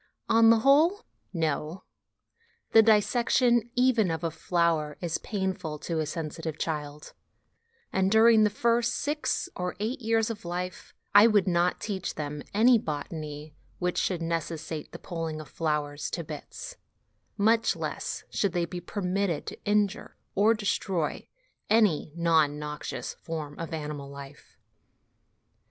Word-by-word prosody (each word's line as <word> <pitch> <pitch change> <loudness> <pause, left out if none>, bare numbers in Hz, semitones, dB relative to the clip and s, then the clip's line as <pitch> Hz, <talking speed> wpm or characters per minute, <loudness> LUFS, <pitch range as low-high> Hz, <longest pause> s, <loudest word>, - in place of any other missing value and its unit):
On 225 0 +6
the 225 -1 +5
whole, 320 - +4 0.3
no: 160 +1 -2 0.9
the 225 - +8
dissection 235 +2 +3
even 245 -6 +3
of 160 0 -3
a 165 - -1
flower 165 -3 0
is 170 -2 -2
painful 190 -7 -3
to 165 +2 -3
a 155 - -1
sensitive 160 0 -5
child, 150 -2 -4 0.8
and, 190 0 +2
during 220 0 +6
the 210 - +4
first 235 +2 +1
six 300 +1 -1
or 180 0 -3
eight 230 +7 -2
years 225 0 +1
of 210 - -8
life, 180 +1 -5 0.2
I 205 +2 +9
would 205 -4 +3
not 175 0 +2
teach 195 -4 -4
them 150 -1 -4
any 230 +3 +5
botany 150 -1 -6 0.2
which 180 0 -1
should 175 -3 -1
necessitate 165 -1 -4
the - - -8
pulling 165 -2 -5
of 155 - -9
flowers 150 -2 -2
to 170 - -4
bits; 150 -1 -8 0.6
much 225 +3 +3
less - - -4
should 200 -4 0
they 175 -1 +1
be 175 +1 -6
permitted 185 -2 -2
to - - -8
injure 210 0 0 0.2
or 215 +4 +4
destroy 195 -6 -2 0.4
any 210 -9 +3
(not 165 -3 +3
noxious) 150 0 -5
form 155 -3 -6
of 165 - -5
animal 150 -3 -5
life. 140 0 -12
175 Hz, 140 wpm, -28 LUFS, 155-215 Hz, 0.9 s, I